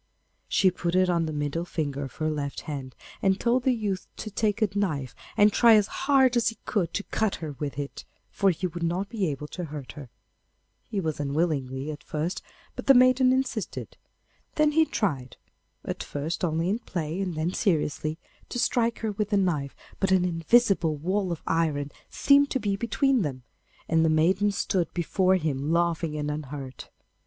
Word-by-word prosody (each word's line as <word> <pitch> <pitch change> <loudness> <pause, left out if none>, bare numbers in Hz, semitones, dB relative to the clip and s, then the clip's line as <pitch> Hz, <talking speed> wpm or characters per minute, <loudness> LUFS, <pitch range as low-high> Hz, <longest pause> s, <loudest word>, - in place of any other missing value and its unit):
She 185 - +3
put 175 0 -2
it 185 -1 +4
on 170 -2 +1
the - - -3
middle 150 +2 -2
finger 145 -5 -3
of 135 - -11
her 155 0 -1
left 145 -2 -4
hand, 135 -4 -6 0.3
and 190 0 +2
told 245 +2 +2
the 260 - +2
youth 210 -6 -2
to 215 - -6
take 210 0 0
a 215 -3 +2
knife 150 -11 -1 0.2
and 205 0 +5
try 230 -2 +7
as 210 -2 +4 0.2
hard 265 -3 +5
as 240 - +2
he 225 - -1
could 190 -6 0
to 205 - -1
cut 215 -1 -1
her 155 -3 -6
with 140 -4 -4
it, 140 -1 -5 0.3
for 195 - +2
he 180 +1 -1
would 175 -1 -4
not 175 +4 -1
be 210 -6 -1
able 150 0 -4
to 180 - -5
hurt 145 -3 -7
her. 145 -4 -10 0.8
He 205 - -2
was 160 -5 -2
unwilling 140 -2 -1
at 150 - -9
first, 155 +4 -3 0.3
but - - -7
the 275 - +8
maiden 255 +1 +5
insisted. 255 -5 -2 0.6
Then 305 -1 +4
he 320 +1 +4
tried, 140 - -2 0.5
at - - -4
first 155 +5 -4
only 165 0 0
in 210 +5 0
play, 170 -4 -4
and 180 -4 -2
then 160 +4 -1
seriously, 155 -3 0 0.3
to - - -4
strike 235 -1 +1
her 220 -1 -1
with 210 0 -2
the 205 - +2
knife, 155 -8 0 0.2
but 195 - +1
an 185 -1 +3
invisible 175 -1 +3
wall 185 +4 -1
of 170 - -5
iron 150 -3 0 0.2
seemed 280 0 +4
to 265 - 0
be 200 -4 0
between 255 +4 +1
them, 135 -7 -3 0.4
and 160 0 +3
the 160 - +3
maiden 180 +6 +3
stood 185 -3 -1
before 185 +2 +2
him 150 -4 -1
laughing 170 -2 +1
and 150 0 -2
unhurt. 140 -3 -7
175 Hz, 190 wpm, -27 LUFS, 150-205 Hz, 0.8 s, the